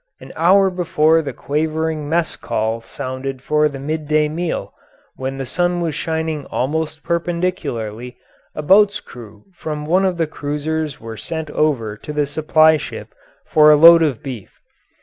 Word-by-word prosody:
An - - -12
hour 190 +3 +4
before 165 -3 +2
the 145 -3 -5
quavering 155 +2 -2
mess 165 0 0
call 110 +1 -2
sounded 130 +2 -6
for 150 +1 +2
the 140 - -8
midday 150 +1 0
meal, 165 +3 -4 0.4
when 135 +1 -4
the 135 - -4
sun 175 +6 0
was 165 -3 -1
shining 160 -1 -3
almost 155 +3 -2
perpendicularly, 165 - -3 0.4
a 150 - -4
boat's 200 +5 +4
crew 105 -4 -13
from 150 -3 -5
one 180 +5 +2
of 185 -2 0
the 165 - +1
cruisers 150 0 -3
were 115 -1 -8
sent 160 +1 -5
over 120 -9 0
to 150 - -8
the 150 -1 +1
supply 155 +2 +3
ship - - -8 0.3
for 150 -1 +5
a 150 - +8
load 165 +2 +8
of 145 -8 0
beef. 125 -8 -8
155 Hz, 155 wpm, -19 LUFS, 135-165 Hz, 0.4 s, a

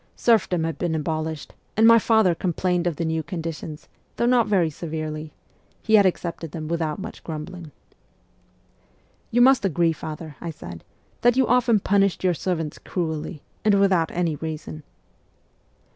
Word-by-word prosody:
Serfdom 200 -7 +2
had 165 0 -3
been 170 -2 -1
abolished, 155 -1 -3 0.2
and 220 - +5
my 230 0 +8
father 220 -5 +3
complained 180 0 0
of 170 - -1
the 165 - -2
new 160 0 0
conditions, 160 -2 -6 0.3
though 235 - 0
not 245 -1 +4
very 180 -6 +2
severely; 155 -1 -5 0.5
he 220 - -1
had 205 -3 +7
accepted 170 -3 -3
them 155 -2 -5
without 160 -2 -1
much 210 +3 -8
grumbling. 165 +1 -7 0.8
' - - -37 0.7
You 245 0 +2
must 265 -1 +6
agree, 170 -3 +2
father,' 155 -2 -8
I 170 - -4
said, 85 - -9 0.2
' - - -38
that 240 +1 +4
you 265 - +4
often 235 -2 +3
punished 200 -1 +2
your 180 -1 +3
servants 165 -3 -3
cruelly, 160 -3 -4 0.2
and 210 -2 +4
without 185 -5 +3
any 170 -3 -1
reason.' 155 0 -6
170 Hz, 160 wpm, -24 LUFS, 160-200 Hz, 0.8 s, my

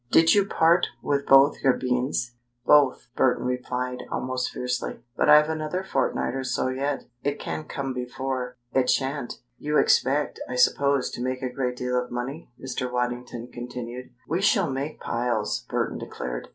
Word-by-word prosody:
Did 165 0 +6
you 200 -1 +4
part 170 -1 +4 0.2
with 140 -1 0
both 135 +1 +6
your 135 -2 +4
beans?" 125 -1 -1 0.3
"Both," 145 -5 +4
Burton 125 -1 +2
replied, 125 0 -2
almost 130 0 -2
fiercely. 125 -1 -3
"But - - +2
I've 150 0 +8
another 160 +3 -2
fortnight 190 - 0
or 135 0 -3
so 130 0 -1
yet. 135 +2 -2 0.2
It 145 0 -1
can't 155 - -5
come 135 -1 -3
before 125 0 -4 0.2
it 130 -1 +2
shan't!" 135 -2 -1 0.2
"You 150 +1 0
expect, 145 +3 +2
I 125 - -3
suppose, 140 +1 +3
to - - -6
make 130 +1 -2
a 125 -1 -3
great 125 -1 -1
deal 125 0 0
of 125 - -12
money?" 130 +6 -5
Mr. 130 -1 -4
Waddington 125 -1 -3
continued. 125 0 -7 0.2
"We 170 +5 0
shall 195 - +3
make 140 +3 -4
piles," 120 -2 -1
Burton - - -1
declared. 60 0 -5
130 Hz, 165 wpm, -25 LUFS, 125-145 Hz, 0.3 s, I've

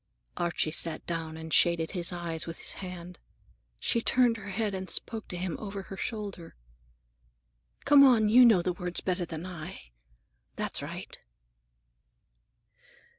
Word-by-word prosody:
Archie 170 -2 0
sat 165 +1 +1
down 165 -2 -4
and 160 0 -7
shaded 170 -2 +4
his 175 -2 -1
eyes 170 -2 -3
with 165 - -5
his - - -2
hand. 180 -1 -8 0.6
She 230 - +1
turned 240 -1 +3
her 205 -1 -8
head 210 +1 -1
and 190 0 -5
spoke 225 -2 -4
to 180 - -5
him 175 -2 -3
over 200 -2 -6
her 195 - -9
shoulder. 200 -4 -5 1.3
"Come 285 -1 +8
on, 235 -5 +6
you 240 +4 +7
know 220 -8 +6
the 180 - 0
words 180 0 -3
better 180 -1 -1
than 160 0 -6
I. 170 - -9 0.6
That's - - -2
right." - - -7
180 Hz, 145 wpm, -29 LUFS, 170-210 Hz, 1.3 s, Come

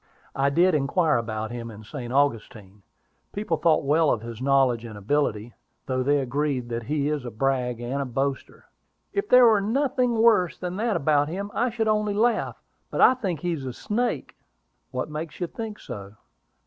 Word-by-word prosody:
"I 135 +1 +2
did 175 +5 +3
inquire 150 +2 +2
about 110 -1 -3
him 120 -1 -6
in 110 -1 -11
St. 120 +1 -7
Augustine: 110 -7 -1 0.5
people 200 -5 -1
thought 160 -2 +3
well 155 +2 +3
of 110 - 0
his 115 0 -8
knowledge 130 -4 +3
and 110 -3 -8
ability, 115 -1 -1 0.3
though 130 -1 -1
they 145 +3 +2
agree 140 +1 -1
that 120 -1 -4
he 145 +1 0
is 150 -3 -1
a 120 - -5
brag 125 0 -1
and 125 +4 -3
a - - -2
boaster." 135 +2 -3 0.5
"If 400 +1 -2
there 250 0 +8
were 220 -3 +5
nothing 250 +2 +1
worse 220 -6 +4
than 180 0 -4
that 225 0 0
about 145 0 +2
him, 200 +4 -4
I 245 +2 +1
should 225 -1 -1
only 210 -1 +1
laugh. 225 +1 +1 0.3
But - - -1
I - - +8
think 190 - -3
he 175 - -1
is 155 -5 -3
a 130 -2 -5
snake." 215 - -2 0.5
"What 130 0 -3
makes 155 +1 -6
you 180 - 0
think 220 +3 -6
so?" 100 -4 -9
145 Hz, 185 wpm, -25 LUFS, 120-200 Hz, 0.5 s, there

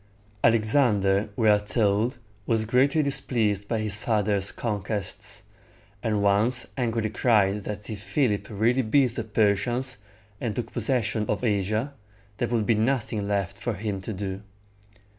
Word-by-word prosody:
Alexander, 110 -3 +3
we 115 - +2
are 105 -1 +6
told, 105 +2 0 0.3
was 110 -1 +1
greatly 135 +7 +3
displeased 110 -7 0
by 115 - -1
his 105 -1 -1
father's 105 -3 0
conquests, 105 -3 -4 0.6
and 105 -3 0
once 105 +6 +3
angrily 115 -4 -1
cried 105 -4 +2
that 105 -1 -6
if 105 -2 -6
Philip 105 -5 0
really 115 +5 +2
beat 125 +1 +2
the 115 - -3
Persians, 115 +4 0 0.4
and 115 -4 -2
took 120 -2 -4
possession 110 -3 0
of 105 - -2
Asia, 110 +5 0 0.4
there - - 0
would 115 -3 0
be 115 - +3
nothing 110 -2 0
left 100 -3 -2
for 120 -3 -2
him 100 -1 -3
to 100 - -5
do. 95 -1 -4
110 Hz, 140 wpm, -26 LUFS, 100-120 Hz, 0.6 s, are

